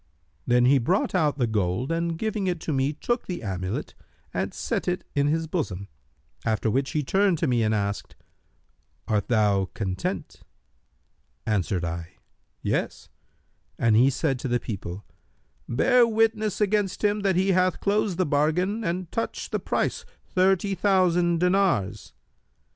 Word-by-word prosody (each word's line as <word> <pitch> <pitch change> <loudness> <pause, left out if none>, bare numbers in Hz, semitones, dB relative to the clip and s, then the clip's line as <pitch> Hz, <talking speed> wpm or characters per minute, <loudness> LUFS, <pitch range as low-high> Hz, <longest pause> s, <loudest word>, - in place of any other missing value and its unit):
Then 125 0 +4
he 135 +2 +5
brought 180 - +1
out 155 -6 +2
the 125 - +2
gold 105 - -1
and 165 0 -1
giving 215 -1 -2
it 175 -2 -1
to 155 - -2
me 135 +1 +1
took 240 - -2
the 175 -7 -4
amulet, 95 -1 -3 0.4
and - - -1
set - - -3
it 180 0 -1
in 140 0 +2
his 160 +2 +1
bosom; 110 - -3 0.5
after 110 0 0
which 135 +4 0
he 150 - 0
turned 190 +4 +2
to 165 - 0
me 125 -4 +2
and 110 -1 +2
asked, 100 -1 -3 0.9
'Art 105 -2 0
thou 105 -4 +2
content?' 95 -3 -4 1.0
Answered 95 -4 0
I, 85 +1 -5 0.5
'Yes,' - - -2 0.7
and 115 -2 +3
he 125 +5 +6
said 135 -1 -1
to 130 - -3
the 120 0 +1
people, 100 -4 -6 0.6
'Bear 245 - +4
witness 220 -2 +1
against 205 -2 0
him 210 0 +2
that 195 -2 +1
he 190 +2 +2
hath 185 -1 +2
closed 205 -3 0
the 185 - +2
bargain 165 +9 +1
and 175 -1 -3
touched 230 - -3
the - - 0
price, - - -1 0.2
thirty 190 +1 +2
thousand 180 -3 +2
dinars.' 180 - +1
160 Hz, 150 wpm, -25 LUFS, -, 1.0 s, he